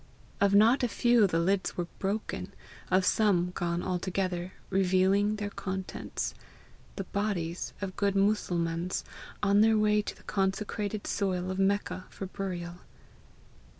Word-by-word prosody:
Of 200 0 +4
not 225 +6 +6
a 245 - +2
few 235 -1 +4
the 165 - 0
lids 185 +3 +1
were 175 - 0
broken, 205 +3 -3 0.3
of 185 +1 +3
some 180 -5 +3
gone 175 -1 -2
altogether, 185 0 -2 0.2
revealing 190 +2 +3
their 205 -1 -4
contents 190 -1 -4 0.6
the 195 - -3
bodies 185 -4 -2
of 190 -2 -4
good 200 -1 +1
Mussulmans, 180 -4 0 0.4
on 200 0 +5
their 220 0 +5
way 210 0 +3
to - - -6
the - - -19
consecrated 205 +1 -2
soil 185 -2 -1
of 185 - -3
Mecca 195 -2 0
for 195 - -6
burial. 180 -2 -5
195 Hz, 135 wpm, -29 LUFS, 180-205 Hz, 0.6 s, not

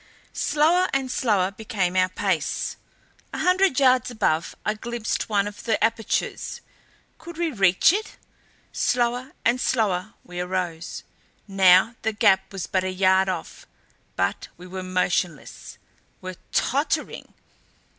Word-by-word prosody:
Slower 325 +5 +2
and 265 -2 0
slower 200 -7 +1
became 200 -4 -2
our 185 0 +3
pace. 185 -4 -1 0.6
A - - -4
hundred 365 -5 +3
yards 255 -3 +4
above 195 -9 -1
I 210 - +1
glimpsed 230 +1 -3
one 205 -1 +1
of 205 0 -9
the 225 -2 +2
apertures. 225 0 -1 0.6
Could 340 -1 -10
we 340 -2 0
reach 195 - +4
it? 430 +2 -4 0.5
Slower 245 +3 0
and 245 +2 +2
slower 215 -3 0
we 175 0 -8
arose. 180 -2 -3 0.4
Now 190 +2 +5
the 220 - -1
gap 200 -3 +3
was 195 -3 -4
but 185 -1 0
a 185 - -1
yard 190 0 +3
off 180 -3 -6 0.5
but - - -1
we 180 - -12
were 185 +1 -6
motionless 180 -3 -2 0.4
were 185 -1 -8
tottering! 285 +5 -1
205 Hz, 130 wpm, -24 LUFS, 185-250 Hz, 0.6 s, Now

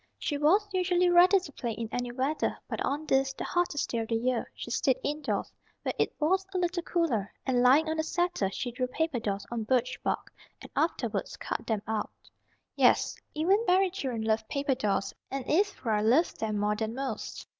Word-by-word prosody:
She 295 - -2
was 340 +9 +3
usually 360 -1 +3
ready 360 +3 +7
to 360 -5 -10
play 235 -4 -4
in 225 +1 -4
any 245 0 -2
weather; 270 +5 -1
but - - -3
on 290 +3 -1
this, 270 -1 +2
the - - -5
hottest 350 -5 0
day 235 - 0
of 225 - -3
the 230 - 0
year, 240 +1 0
she 240 - -7
stayed 260 +1 +2
indoors, 295 0 -2 0.3
where - - -1
it - - +2
was 370 +5 +2
a - - +2
little 350 0 0
cooler, 300 - 0
and 250 -2 +2
lying 270 +6 +5
on 315 0 -1
the 315 - +1
settle 345 - 0
she 245 +5 -4
drew 255 +1 -2
paper 300 0 -1
dolls 200 -3 -3
on 235 -1 -2
birch 250 +2 0
bark, - - -2 0.3
and - - -12
afterwards - - -1
cut - - -4
them 215 -3 -1
out. 215 -1 -1 0.7
Yes, - - +4 0.2
even 380 +8 +3
fairy 370 +1 +4
children 260 - -3
love 220 0 0
paper 280 -1 0
dolls 205 -6 -1 0.2
and 270 -1 -4
Ivra 300 - +1
loved 250 +11 +3
them 215 -1 -1
more 210 +1 +1
than 220 +1 -3
most. 270 0 -4
270 Hz, 200 wpm, -29 LUFS, 230-335 Hz, 0.7 s, ready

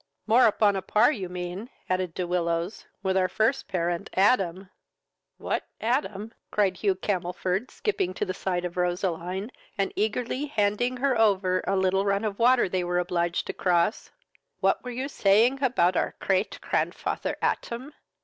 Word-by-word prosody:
"More 230 +3 +6
upon 205 -1 +3
a 190 - -1
par, 215 +8 +4
you 195 -10 -4
mean, 180 +5 -5 0.2
(added 185 -2 -1
De 180 - -2
Willows,) 175 +2 -2 0.2
with 190 -1 +1
our 185 -1 +3
first 220 +8 0
parent 175 -3 -2
Adam." 190 -2 +2 0.7
"What - - -3
Atam? 225 -3 -1 0.2
(cried 195 -3 +1
Hugh 195 0 +1
Camelford, 185 +3 -2
skipping 185 - -2
to 210 - -1
the 185 - -3
side 180 -2 -2
of 175 0 -5
Roseline, 180 +3 -2 0.3
and 195 -1 0
eagerly 240 +6 -1
handing 225 +1 0
her 265 0 +1
over 195 -5 +2
a 195 - +2
little 190 0 +2
run 200 +1 +1
of 205 -2 -3
water 245 0 +5
they 185 0 -1
were 175 0 -1
obliged 175 -1 0
to - - -4
cross,) 175 +3 +1 0.5
what - - +1
were 250 - -6
you 255 +3 -3
saying 235 +2 +3
about 185 -9 +2
our - - 0
crate 190 +1 0
crandfather - - -1
Atam? 255 +5 -2
195 Hz, 160 wpm, -26 LUFS, 180-225 Hz, 0.7 s, More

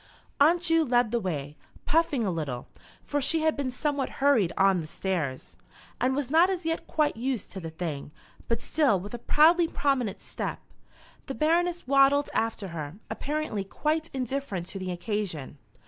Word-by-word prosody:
Aunt 335 +5 +5
Ju 330 -2 +3
led 245 -5 +2
the 235 - +1
way, 150 -7 -4 0.3
puffing 300 -7 +2
a 190 - 0
little, 140 -7 -4 0.4
for 290 0 -1
she 320 +4 +2
had 315 0 +2
been 280 -3 -2
somewhat 280 +1 -1
hurried 265 -11 +3
on 190 -2 +4
the 155 - -7
stairs, 155 -7 -3 0.4
and 260 +1 +1
was 280 -2 -2
not 335 +4 +6
as 365 -3 -2
yet 325 0 -2
quite 300 -2 +1
used 245 -2 -3
to 195 - -6
the 165 -3 -6
thing, 160 -4 -5 0.4
but 230 -1 -1
still 285 -11 +2
with 205 +5 -8
a 240 - -4
proudly 330 +7 +5
prominent 270 -10 0
step. - - -5 0.7
The 270 - -4
Baroness 345 +3 +1
waddled 275 +2 +4
after 220 -3 -1
her, 155 -2 -6 0.2
apparently 285 -4 -2
quite 310 +10 -1
indifferent 255 -8 -3
to 195 - -6
the 185 -1 -4
occasion. 175 - -3
255 Hz, 170 wpm, -27 LUFS, 190-300 Hz, 0.7 s, not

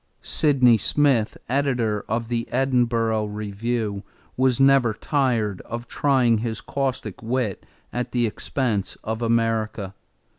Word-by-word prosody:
Sydney 130 -6 +4
Smith, 130 -2 +2
editor 125 -5 0
of 115 0 -1
the 115 0 -2
Edinburgh 120 -4 +1
Review, 105 0 -3 0.3
was 130 -1 +2
never 135 -5 +4
tired 115 - 0
of 120 +1 -7
trying 125 -6 +2
his 110 -1 -3
caustic 130 -7 -3
wit 115 -3 -2 0.3
at 125 +1 -3
the 120 -1 +1
expense 110 -2 -2
of 110 +1 -3
America. 115 -4 0
115 Hz, 115 wpm, -23 LUFS, 110-130 Hz, 0.3 s, Sydney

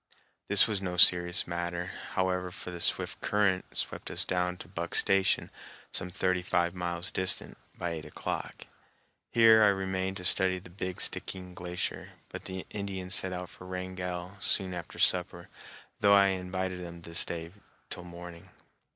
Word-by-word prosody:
This 100 0 +8
was 105 -3 -2
no 90 -2 -4
serious 90 +1 +6
matter, 85 +1 -4 0.2
however, 90 -1 0
for 90 0 -7
the 85 -1 -6
swift - - 0
current 100 -3 0
swept - - -2
us - - +1
down 90 0 -1
to 80 - -10
Buck 85 -1 -5
Station, 95 -2 +3 0.4
some 90 - 0
thirty 95 0 0
five 90 -1 0
miles 90 0 -3
distant, 95 0 +1 0.2
by 85 - -3
eight 80 -2 -6
o'clock. - - -6 0.6
Here 115 -1 +6
I - - +6
remained 95 -1 -1
to 90 - -5
study 95 +1 +5
the 90 -1 -12
"Big 90 -1 -5
Stickeen 90 -1 -3
Glacier," 90 0 -4 0.2
but - - -9
the 95 0 -6
Indians 95 -3 -4
set 95 - +3
out 90 0 -5
for 90 - -13
Wrangell 90 0 -5
soon 95 -2 +3
after 85 -2 -8
supper, 90 -1 +1 0.5
though 100 0 +5
I 100 -1 +5
invited 95 0 -3
them 85 -1 -9
to 85 - -10
stay 85 -1 -2 0.4
till 90 - -2
morning. 85 -1 -11
90 Hz, 160 wpm, -29 LUFS, 90-95 Hz, 0.6 s, This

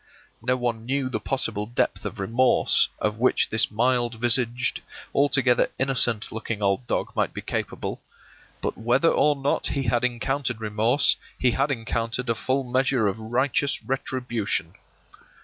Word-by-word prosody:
No 125 +2 0
one 120 -2 -2
knew 135 0 -1
the 110 - -2
possible 105 -3 -1
depth 120 - -1
of 110 - -5
remorse 115 +6 +3
of 105 +1 -1
which 130 - +2
this 110 0 +4
mild 120 +1 +1
visaged, 120 +1 +1 0.3
altogether 135 -3 +3
innocent 120 -5 +2
looking 110 -1 -4
old 100 +4 0
dog - - -2
might - - 0
be - - -4
capable; - - -4 0.6
but - - -1
whether 125 +8 +3
or 150 0 +3
not 140 0 0
he 140 - -1
had 120 0 0
encountered 125 0 -1
remorse, 110 +5 +2 0.2
he 125 - +2
had 135 +4 0
encountered 115 -1 -2
a - - +3
full 130 +4 -1
measure 130 -2 +1
of 100 +3 -2
righteous 130 +5 0
retribution. 125 -4 -3
120 Hz, 150 wpm, -25 LUFS, 115-130 Hz, 0.6 s, this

